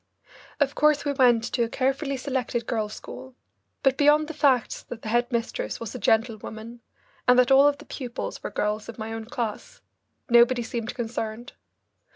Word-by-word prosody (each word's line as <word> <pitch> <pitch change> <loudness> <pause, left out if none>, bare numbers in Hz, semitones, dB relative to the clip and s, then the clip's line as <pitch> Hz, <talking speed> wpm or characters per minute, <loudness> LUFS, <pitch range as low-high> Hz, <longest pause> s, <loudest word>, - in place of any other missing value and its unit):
Of 285 -1 +2
course 300 0 +3
we 285 - +1
went 245 -4 +4
to 245 - +1
a 230 - +1
carefully 270 +3 -1
selected 255 -3 -2
girls' 215 -3 -2
school, 260 -1 -10 0.5
but 270 -1 +2
beyond 300 +1 +5
the 320 - -6
facts 275 -6 +2
that 235 -2 -10
the 215 - -4
head 240 +3 +1
mistress 235 -1 -2
was 230 -2 -6
a 250 - -6
gentlewoman 225 +1 -1 0.5
and 250 0 +6
that 250 +1 +4
all 275 +2 +7
the 285 - -14
pupils 250 -4 -6
were - - -4
girls 210 +1 -2
of 230 - -8
my 220 0 -5
own 225 0 -5
class, 230 -2 -5 0.4
nobody 240 0 +5
seemed 230 0 -4
concerned. 225 0 -5
240 Hz, 175 wpm, -25 LUFS, 225-270 Hz, 0.5 s, all